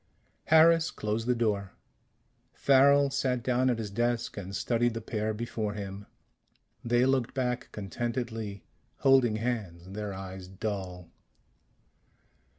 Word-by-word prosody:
Harris 160 +1 +6
closed 110 +2 -3
the 125 - +3
door. 105 -4 -1 0.8
Farrel 140 +1 +5
sat 130 -3 0
down 130 +1 +2
at 120 - +1
his 110 -3 -5
desk 120 +2 -1
and 100 -1 -6
studied 120 -1 +1
the - - -2
pair 110 0 -2
before 110 -1 -3
him. 100 0 -7 0.8
They 120 +1 +3
looked 130 -3 +1
back 125 -2 -2
contentedly, 110 0 -4 0.4
holding 130 -5 +5
hands, 105 -7 -4
their 105 0 -4
eyes 95 -1 -7
dull. 95 -3 -5
115 Hz, 120 wpm, -29 LUFS, 100-125 Hz, 0.8 s, Harris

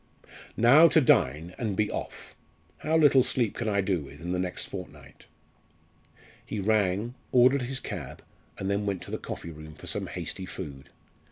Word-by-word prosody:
Now 140 +9 +7
to 165 - +5
dine, 90 - +2
and 110 -5 -2
be 105 -1 +1
off! - - -6 0.4
How 160 +1 +1
little 145 -4 +6
sleep 125 -3 0
can 115 -2 -1
I 100 -1 +2
do 95 -3 0
with 70 0 -12
in 85 +1 -5
the 90 - -1
next 90 -1 -2
fortnight?" - - -10 1.2
He 105 - -5
rang, 105 +2 +1 0.2
ordered 130 +2 +5
his 130 +2 -2
cab, - - -7 0.3
and 95 - -4
then 100 +1 -1
went 95 -3 -2
to - - -10
the - - -3
coffee 85 - -7
room 75 0 -11
for - - -13
some - - -1
hasty 95 - -4
food. 70 -8 -8
100 Hz, 175 wpm, -27 LUFS, 90-125 Hz, 1.2 s, Now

